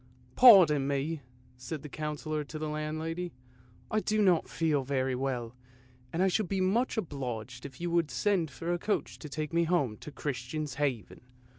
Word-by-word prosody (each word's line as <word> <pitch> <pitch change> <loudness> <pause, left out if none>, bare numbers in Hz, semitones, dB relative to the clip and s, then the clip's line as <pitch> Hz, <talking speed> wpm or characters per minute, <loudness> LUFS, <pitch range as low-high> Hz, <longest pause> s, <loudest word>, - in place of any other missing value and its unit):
" - - -27
Pardon 170 - +8
me! 140 +3 -1 0.2
" 125 - -29
said 140 +4 -6
the - - -6
Councillor 150 +1 -3
to 155 - -7
the 155 0 -3
landlady; 155 +3 -3 0.3
" 120 -1 -28
I 215 - +2
do 215 0 0
not 185 -5 +3
feel 155 -4 +1
very 130 -1 0
well, 125 -2 -3 0.6
and 175 +3 +1
I - - +4
should 190 0 0
be 195 - 0
much 220 +8 +1
obliged 125 - -4
if 130 -2 -15
you 175 0 -2
would 170 -3 +2
send 190 -6 +1
for 165 +5 -3
a 175 - -1
coach 210 - -2
to 150 - -8
take 155 +2 -4
me 170 0 +3
home 145 -11 +1
to 150 - -9
Christian's 145 +1 -4
Haven." 130 -9 -2
150 Hz, 190 wpm, -30 LUFS, 135-175 Hz, 0.6 s, Pardon